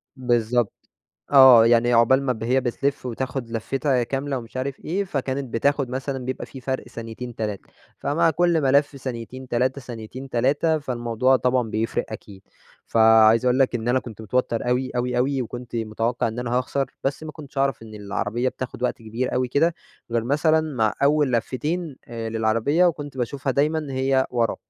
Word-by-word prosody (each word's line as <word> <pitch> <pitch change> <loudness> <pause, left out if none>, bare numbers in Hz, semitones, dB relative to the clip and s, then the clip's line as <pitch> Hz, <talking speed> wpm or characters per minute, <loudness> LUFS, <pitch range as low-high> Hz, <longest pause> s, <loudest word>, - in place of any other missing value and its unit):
بالضبط 120 -3 +1 0.6
آه، 130 -4 +9
يعني 120 +1 +4
عقبال 120 +4 +5
ما 130 -2 +1
ب 110 -1 -6
هي 130 +3 +2
بتلف 130 +2 -2
وتاخذ 125 +2 -3
لفِّتها 130 +3 0
كاملة 135 +2 -2
ومش 115 +1 -10
عارف 130 +1 -3
إيه، 190 +5 -2
فكانت 135 -6 -3
بتاخد 140 +3 +1
مثلًا 130 0 -4
بيبقى 130 +1 -4
فيه 135 - -10
فرْق 130 +1 -3
ثانيتن 115 +1 -7
3، 105 -3 -4 0.3
فمع 165 +3 +2
كل 170 0 +2
ملف 140 +1 +3
ثانيتين 130 0 -7
3، 130 +3 0
ثانيتين 125 +2 -8
3، 145 +6 +2
فالموضوع 125 -1 +1
طبعًا 125 -2 0
بيفرِق 110 +1 -1
أكيد. 100 -3 -10 0.4
فعايز 110 +1 +5
أقول 125 0 +3
لك 135 -2 +3
إن 120 0 -2
أنا 125 +2 +3
كنت 115 -4 -10
متوتّر 120 +1 -1
أوي، 125 +1 0
أوي، 125 0 0
أوي، 130 +1 +1
وكنت 120 0 -7
متوقِّع 115 +2 -1
إن 110 +2 -6
أنا 125 -1 -3
هاخسر، 130 +3 0 0.2
بس 135 +3 -1
ما 155 - -7
كنتش 145 -3 -9
أعرف 135 -4 0
إن 110 -1 -11
العربيّة 105 +4 -2
بتاخد 130 -1 -7
وقت 125 - 0
كبير 115 +3 -3
أوي 125 0 0
كده، 165 +6 +2 0.4
غير 115 -1 0
مثلًا 155 +5 +3
مع 110 -3 +2
أوّل 145 -1 +3
لفتين 145 +7 -2
آآ 115 -1 -5
للعربية، 115 +9 +2
وكنت 145 -5 -1
باشوفها 135 +3 -2
دايمًا 150 +3 +1
هي 130 0 +1
ورا، 120 -2 0
125 Hz, 170 wpm, -23 LUFS, 115-140 Hz, 0.6 s, آه